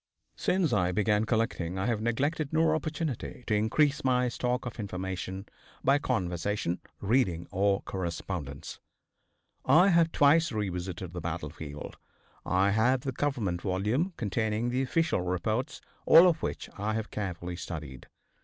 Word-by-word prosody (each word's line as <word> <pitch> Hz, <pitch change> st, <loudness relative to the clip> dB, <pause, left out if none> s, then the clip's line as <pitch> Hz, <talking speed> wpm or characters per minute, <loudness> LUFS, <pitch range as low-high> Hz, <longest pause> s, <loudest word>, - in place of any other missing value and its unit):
Since 180 Hz, -8 st, +1 dB
I 90 Hz, -3 st, +2 dB
began 105 Hz, +2 st, +2 dB
collecting 110 Hz, -6 st, -1 dB
I 95 Hz, -, -1 dB
have 115 Hz, -3 st, 0 dB
neglected 140 Hz, +6 st, 0 dB
no 160 Hz, 0 st, +3 dB
opportunity 155 Hz, -5 st, -3 dB
to 110 Hz, -, 0 dB
increase 125 Hz, +8 st, +2 dB
my 125 Hz, -1 st, +2 dB
stock 125 Hz, +1 st, -1 dB
of 120 Hz, -1 st, -6 dB
information 95 Hz, -1 st, -4 dB, 0.4 s
by 140 Hz, +2 st, +4 dB
conversation, 95 Hz, -, -1 dB, 0.2 s
reading 100 Hz, -6 st, +1 dB
or 100 Hz, +1 st, +1 dB
correspondence. 85 Hz, -5 st, -5 dB, 0.8 s
I 170 Hz, +9 st, +6 dB
have 170 Hz, -2 st, +4 dB
twice 155 Hz, +2 st, +4 dB
revisited 90 Hz, -4 st, -4 dB
the 90 Hz, -, -5 dB
battlefield. 80 Hz, -3 st, -6 dB, 0.5 s
I 95 Hz, +2 st, +3 dB
have 120 Hz, +5 st, +3 dB
the 135 Hz, -, -3 dB
Government 120 Hz, -11 st, -1 dB
volume 105 Hz, -, 0 dB
containing 110 Hz, +1 st, -1 dB
the 125 Hz, +2 st, 0 dB
official 160 Hz, -, +1 dB
reports, 110 Hz, -, -2 dB, 0.3 s
all 170 Hz, +3 st, +9 dB
of 165 Hz, -3 st, +1 dB
which -, -, -3 dB
I 105 Hz, +1 st, -1 dB
have 110 Hz, -1 st, -4 dB
carefully 90 Hz, -3 st, -4 dB
studied. 75 Hz, -7 st, -7 dB
110 Hz, 135 wpm, -29 LUFS, 90-130 Hz, 0.8 s, all